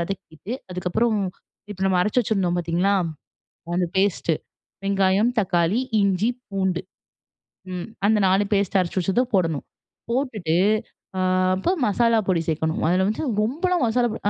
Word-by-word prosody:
வதக்கிட்டு, 170 +2 -6 0.2
அதுக்கப்றம் 185 +5 0 0.5
இப்போ 190 - -14
நம்ம 185 -1 +2
அரைச்சி 210 +7 +2
வச்சிருந்தோம் 195 -6 0
பார்த்தீங்களா, 175 +4 +1 0.8
அந்த 180 0 +1
பேஸ்ட்டு, 190 -4 +1 0.5
வெங்காயம், 195 +3 +3
தக்காளி, 180 +2 +1 0.2
இஞ்சி, 200 +3 +2 0.2
பூண்டு 190 -3 -1 0.9
ம் 180 +3 -5 0.2
அந்த 215 0 +4
4 190 +2 +3
பேஸ்ட்டு 200 -1 +2
அரைச்சு 180 +1 -2
வச்சது 190 +7 +2
போடணும். 165 -6 +1 0.5
போட்டுட்டு 230 - -1 0.6
அ - - +1 0.3
அப்போ 190 - 0 0.2
மசாலா 230 +2 +3
பொடி 180 -3 +2
சேக்கணும். 160 0 0
அதில 185 +2 +3
வந்து 220 +9 -2 0.2
ரொம்பலாம் 335 - 0
மசாலா 240 +2 +2
பொடி - - -7
195 Hz, 130 wpm, -23 LUFS, 180-215 Hz, 0.9 s, அந்த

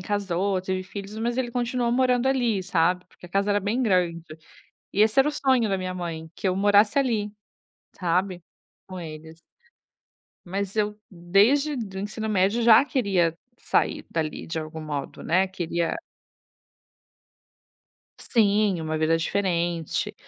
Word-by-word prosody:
casou, 195 -1 -1
teve 185 0 -2
filhos, 200 +2 -8
mas 235 +2 -1
ele 255 -2 -1
continuou 240 0 -1
morando 250 0 +2
ali, 240 -7 +1
sabe, 180 0 +1
porque 180 - -15
a - - -15
casa 200 +3 0
era 205 - +3
bem 220 +6 -1
grande. 180 -6 +1 0.7
E 205 - 0
esse 220 +4 +4
era 275 +2 +5
o - - -2
sonho 260 -6 +2
da 195 - +1
minha 185 0 -4
mãe, 165 -3 -6
que - - -3
eu 185 - +1
morasse 205 +4 +4
ali, 220 -6 0 0.7
sabe, 180 0 0 0.5
com 185 -1 -7
eles. 160 0 -9 1.1
Mas 195 +2 -3
eu 210 -1 0
desde 205 - +2
do 195 -6 -5
ensino 215 +2 -4
médio 200 +4 +2
já 230 +2 +7
queria 190 - +1 0.2
sair - - 0
dali 155 -2 -3
de 160 - -4
algum 155 0 -7
modo, 145 -2 -5
né, 185 +3 +2
queria 170 -2 -2 2.2
Sim, 205 -5 +2
uma 155 0 -2
vida 160 +1 +2
diferente. 170 -2 -1
195 Hz, 145 wpm, -25 LUFS, 175-220 Hz, 2.2 s, já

